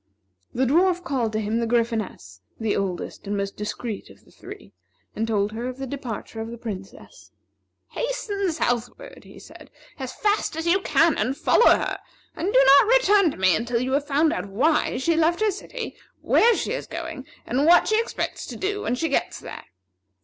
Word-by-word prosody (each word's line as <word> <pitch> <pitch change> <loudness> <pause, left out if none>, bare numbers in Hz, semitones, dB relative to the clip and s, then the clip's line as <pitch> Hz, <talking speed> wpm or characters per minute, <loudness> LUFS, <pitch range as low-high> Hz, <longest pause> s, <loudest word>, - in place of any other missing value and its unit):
The 260 - 0
Dwarf 355 +6 +2
called 255 -8 -1
to 215 - 0
him 220 +2 -1
the 230 - -1
Gryphoness, 225 - -2 0.2
the 225 -2 0
oldest 195 +1 -4
and 205 0 -2
most 200 0 -3
discreet 210 +1 -5
of - - -18
the - - -22
three, - - -12 0.4
and 225 +1 -1
told 210 -2 0
her 230 +3 -4
of 255 0 -6
the 270 - -5
departure 245 -4 -6
of 225 - -5
the 235 - -8
Princess. 200 -5 -9 0.6
"Hasten 410 -6 -2
southward," 245 - -3
he - - -14
said, - - -14 0.3
"as 260 -1 -5
fast 415 -5 0
as 325 +1 -4
you 365 +3 +3
can, 330 -4 +3
and 265 +2 -1
follow 475 - +4
her, - - +1 0.4
and 375 +4 -2
do 270 - +6
not 280 +8 +7
return 415 -6 +4
to - - -7
me 185 -2 +4
until 235 +5 -1
you 255 +2 -2
have 285 +2 0
found 305 +3 +2
out 335 - -4
why 275 +11 +1
she 325 +6 +1
left 330 +2 +2
her 430 -1 +2
city, 470 +5 -7 0.3
where 470 0 +4
she - - -2
is - - -4
going, 325 -5 -7 0.2
and 270 +6 +1
what 345 - +6
she 435 +1 +3
expects 465 - -4
to - - -7
do 410 +2 -2
when 240 - -1
she 325 +6 -1
gets 280 - -1
there. - - -9
270 Hz, 195 wpm, -24 LUFS, 225-345 Hz, 0.6 s, not